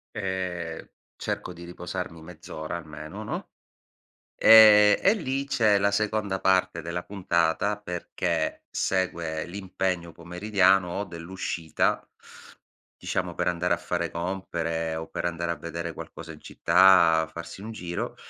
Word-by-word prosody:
ehm, 90 -4 -4 0.3
cerco - - -4
di 85 0 -11
riposarmi 90 -1 -6
mezz'ora 80 -1 -7
almeno, 75 -2 -8
no, - - -5 0.9
ehm, 105 -2 +8
e 195 - +6
lì 135 -9 -2
c'è 110 -7 +3
la 100 +1 +2
seconda 105 -1 -1
parte 95 -3 +2
della 85 +2 -4
puntata, 95 +1 0
perché 90 -4 -3
segue 85 -4 -1
l'impegno 90 -2 -3
pomeridiano 90 +1 +2
o 100 - -1
dell'uscita, 85 -2 -2 0.9
diciamo, - - -3
per - - -1
andare 90 0 0
a - - -11
fare 85 0 -2
compere 85 -2 -3
o 80 0 -5
per - - -4
andare 85 0 -2
a - - -3
vedere 85 0 -5
qualcosa 80 +2 -9
in 75 - -12
città, 85 -2 +4
farsi 85 +3 -8
un 110 +2 -7
giro, 90 -5 -5
90 Hz, 130 wpm, -26 LUFS, 85-95 Hz, 0.9 s, ehm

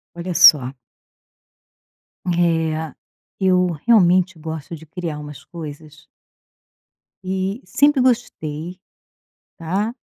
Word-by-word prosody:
Olha 175 +1 -5
só 135 -5 +7 1.5
eh, 165 -3 0 0.5
eu 180 -2 +2
realmente 185 -5 +3
gosto 160 0 -7
de 160 - -14
criar 165 -2 -5
umas 150 -1 -10
coisas 155 -2 -10 1.2
e 190 +5 -3
sempre 290 -1 +3
gostei, 180 -9 -2 0.8
tá. 195 +8 -2
170 Hz, 85 wpm, -20 LUFS, 155-190 Hz, 1.5 s, só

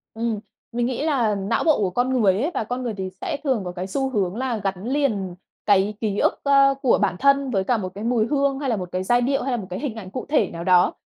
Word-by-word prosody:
Ừm, 225 -2 -1 0.3
mình 240 0 0
nghĩ 255 +3 -2
là 245 -9 +1
não 200 +3 -1
bộ 315 -3 +4
của 195 -3 +1
con 245 +7 0
người 195 -3 +5
ấy 310 +6 0
và - - -1
con 245 +3 -4
người 235 -3 -2
thì 190 -1 -3
sẽ - - -2
thường 260 -6 +1
có 180 - -4
cái 180 +1 -5
xu 270 +6 -1
hướng 195 -6 -1
là 250 -1 -1
gắn 195 -1 -3
liền 220 -10 0 0.3
cái 205 0 +3
ký 210 -3 -1
ức, - - +1
ơ, 275 -1 +5
của 255 - +4
bản - - +1
thân 275 -1 +3
với 195 -4 +1
cả 235 +4 +1
một 185 -3 -4
cái 205 - -6
mùi 235 -2 +2
hương 280 -1 +1
hay 275 - -2
là 235 - +1
một 180 -1 -5
cái 185 +1 -2
giai 240 +4 +3
điệu, 275 +2 0
hay 270 - -2
là 245 - 0
một 200 -5 -6
cái 180 - -4
hình 275 -7 -4
ảnh 195 -5 -8
cụ 255 - -5
thể 285 -10 +2
nào 170 - -6
đó. 180 0 +4
230 Hz, 280 wpm, -23 LUFS, 195-265 Hz, 0.3 s, người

